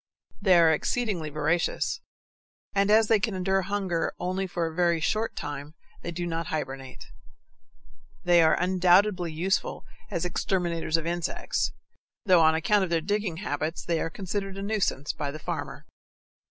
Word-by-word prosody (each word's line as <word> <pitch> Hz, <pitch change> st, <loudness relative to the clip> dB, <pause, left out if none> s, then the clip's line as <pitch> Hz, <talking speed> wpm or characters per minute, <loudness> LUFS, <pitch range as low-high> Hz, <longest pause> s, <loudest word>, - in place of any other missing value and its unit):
They 190 Hz, -3 st, +5 dB
are 165 Hz, -1 st, +6 dB
exceedingly 185 Hz, -2 st, -1 dB
voracious, 155 Hz, +3 st, 0 dB, 0.7 s
and 200 Hz, 0 st, +2 dB
as 220 Hz, +1 st, +5 dB
they 220 Hz, -1 st, +4 dB
can 215 Hz, -2 st, -1 dB
endure 190 Hz, +1 st, +1 dB
hunger 190 Hz, -3 st, -2 dB
only 185 Hz, +2 st, -2 dB
for 175 Hz, -2 st, -2 dB
a 160 Hz, -, -4 dB
very 170 Hz, -1 st, +2 dB
short 215 Hz, +8 st, -1 dB
time, 145 Hz, +1 st, -6 dB, 0.3 s
they -, -, -5 dB
do 175 Hz, +1 st, -3 dB
not 165 Hz, -1 st, -3 dB
hibernate. 135 Hz, -4 st, -5 dB, 1.2 s
They 175 Hz, -1 st, +5 dB
are 160 Hz, -1 st, +4 dB
undoubtedly 180 Hz, 0 st, +3 dB
useful 180 Hz, +5 st, -1 dB, 0.2 s
as 170 Hz, +1 st, -2 dB
exterminators 170 Hz, -2 st, 0 dB
of 165 Hz, -, -4 dB
insects, 170 Hz, 0 st, -1 dB, 0.5 s
though 180 Hz, -4 st, +6 dB
on 160 Hz, 0 st, +5 dB
account 200 Hz, +5 st, +2 dB
of 185 Hz, -, -2 dB
their 170 Hz, -1 st, +2 dB
digging 200 Hz, 0 st, -2 dB
habits 155 Hz, +3 st, -3 dB
they 170 Hz, -1 st, 0 dB
are -, -, -1 dB
considered 195 Hz, +2 st, -4 dB
a 195 Hz, -, -4 dB
nuisance 200 Hz, -9 st, -1 dB
by 145 Hz, -, -3 dB
the 145 Hz, -, -6 dB
farmer. 155 Hz, -, -5 dB
175 Hz, 155 wpm, -27 LUFS, 160-195 Hz, 1.2 s, are